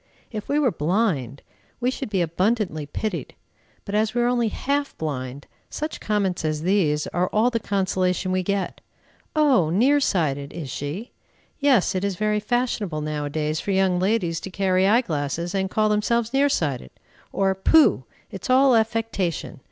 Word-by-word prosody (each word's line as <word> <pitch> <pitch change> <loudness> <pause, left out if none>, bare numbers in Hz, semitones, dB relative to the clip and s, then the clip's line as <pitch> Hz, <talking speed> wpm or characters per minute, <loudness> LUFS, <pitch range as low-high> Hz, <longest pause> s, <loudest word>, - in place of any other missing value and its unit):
If 215 -3 -6
we 285 - +2
were 280 -5 +3
blind, 155 - -1 0.4
we 250 +1 +1
should 265 -2 -5
be 190 -4 +1
abundantly 180 -2 -1
pitied, 215 +8 -4 0.5
but 200 - -6
as 215 +2 +1
we 240 - +2
are - - +2
only 240 -2 +2
half 280 +5 -2
blind, 140 -3 -4 0.2
such 305 +1 -4
comments 200 -5 -1
as 155 0 -1
these 165 -6 +2
are 180 +2 -1
all 225 +6 +2
the 230 - 0
consolation 185 -2 0
we 185 0 +1
get. 195 0 -2 0.5
"Oh! 275 - +4
near 255 - +3
sighted, 145 - 0
is 155 -6 -6
she? 155 - -5 0.5
Yes, 270 -9 +3
it 185 0 -2
is 200 -2 -1
very 210 +2 0
fashionable 210 -7 -1
now 150 -1 -3
a - - -3
days 155 +1 -1
for - - -6
young 190 -2 +2
ladies 185 -4 0
to - - -7
carry 190 0 +2
eye 225 +5 +5
glasses, 170 - -3
and 190 -1 0
call 215 +2 +2
themselves 230 +3 +1
near 280 +1 +3
sighted!" 140 - -1 0.4
Or, 195 -1 +1
"Pooh! 190 - +4 0.3
It's 195 +3 -7
all 260 0 +5
affectation. 220 - -1
195 Hz, 170 wpm, -23 LUFS, 165-230 Hz, 0.5 s, eye